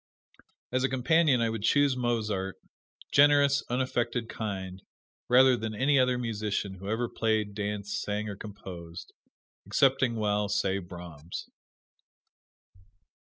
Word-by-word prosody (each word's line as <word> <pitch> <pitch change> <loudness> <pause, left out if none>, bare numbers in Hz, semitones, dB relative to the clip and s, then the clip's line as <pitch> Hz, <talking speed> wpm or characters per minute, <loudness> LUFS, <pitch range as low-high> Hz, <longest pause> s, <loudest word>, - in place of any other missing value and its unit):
As 130 +1 0
a 135 - +2
companion 135 +1 +3
I 115 -1 +1
would 110 -2 -4
choose 140 +4 +3
Mozart 110 -6 -1 0.6
generous, 145 -1 +5
unaffected, 120 -2 -1
kind 95 -3 -5 0.5
rather 130 +1 +6
than 110 -2 -4
any 135 +5 +3
other 125 -1 +3
musician 105 -4 -2
who 95 +1 -8
ever 115 +3 0
played, 110 -3 -1
danced, 105 0 -3
sang 105 +1 -3
or 100 - -5
composed 90 -4 -9 0.5
excepting, 130 -3 +3
well, 105 -1 0
say 100 -1 0
Brahms. 85 -3 -9
110 Hz, 115 wpm, -28 LUFS, 100-125 Hz, 0.6 s, rather